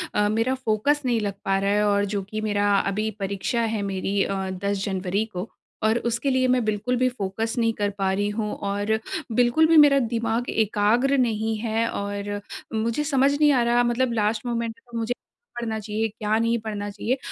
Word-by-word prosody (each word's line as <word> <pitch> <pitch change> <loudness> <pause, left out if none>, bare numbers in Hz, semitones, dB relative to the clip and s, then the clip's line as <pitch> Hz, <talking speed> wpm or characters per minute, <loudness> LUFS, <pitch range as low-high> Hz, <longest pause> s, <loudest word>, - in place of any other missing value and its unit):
अ, 210 0 +3
मेरा 225 +4 +1
फोकस 260 +4 +1
नहीं 240 -3 +2
लग 200 -2 -2
पा 195 0 +2
रहा 200 0 +1
है 210 +1 +2
और 205 0 +2
जो 200 - 0
कि 215 0 -3
मेरा 205 -1 +1 0.2
अभी 215 +2 -1
परीक्षा 200 +4 -1
है 210 - -1
मेरी 195 +1 0
अ, 195 - -2
10 195 +1 -2
जनवरी 195 +1 -1
को 180 +5 -4 0.3
और 220 +1 +3
उसके 235 +5 -1
लिए 260 -1 +2
मैं 250 -1 +2
बिल्कुल 215 +4 0
भी 255 +1 +3
फोकस 225 0 -3
नहीं 230 -1 +2
कर 205 0 +1
पा 195 -1 +1
रही 205 +1 0
हूँ, 210 0 -2
और 205 +2 -1 0.3
बिल्कुल 245 +7 +4
भी 330 - +5
मेरा 285 -2 +7
दिमाग 230 0 -1
एकाग्र 225 +6 +2
नहीं 220 -3 +1
है। 225 0 0
और 205 0 -4 0.3
मुझे 230 +6 0
समझ 280 -2 +3
नहीं 300 -1 +5
आ 245 -3 +3
रहा 240 +1 +3
मतलब 240 0 +1
लास्ट 215 +1 0
मोमेंट 235 -1 -2 0.2
में 230 - -2
मुझे 230 +2 -1
क्या - - -44 0.4
पढ़ना 220 -2 -2
चाहिए, 215 +1 -2
क्या 215 0 -1
नहीं 230 +1 +2
पढ़ना 210 -2 -4
चाहिए? 230 +5 -2
220 Hz, 200 wpm, -24 LUFS, 205-240 Hz, 0.4 s, मेरा